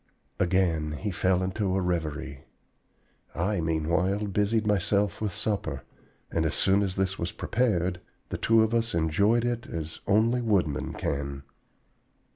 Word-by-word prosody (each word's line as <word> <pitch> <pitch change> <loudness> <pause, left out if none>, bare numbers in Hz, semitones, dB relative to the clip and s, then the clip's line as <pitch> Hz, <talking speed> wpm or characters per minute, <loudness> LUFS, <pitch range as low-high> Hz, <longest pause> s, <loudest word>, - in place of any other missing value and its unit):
Again 85 -4 +1
he 100 +7 -3
fell 90 +1 +1
into 95 0 -1
a - - +2
reverie. 80 -6 -3 0.9
I, 90 +2 0
meanwhile, 85 +6 0
busied 105 +2 +1
myself 105 0 +1
with 105 -2 -1
supper; 105 +3 -2 0.5
and 80 - +1
as 80 - 0
soon 100 +1 +3
as 95 -2 -1
this 95 0 -1
was 85 0 -2
prepared, 90 -7 0 0.3
the - - -4
two 115 0 +4
of 110 +1 0
us 115 -3 0
enjoyed 100 +9 +2
it 120 0 -2
as 80 -1 -5
only 115 +4 +3
woodmen 95 - 0
can. 70 0 -3
95 Hz, 140 wpm, -27 LUFS, 85-105 Hz, 0.9 s, two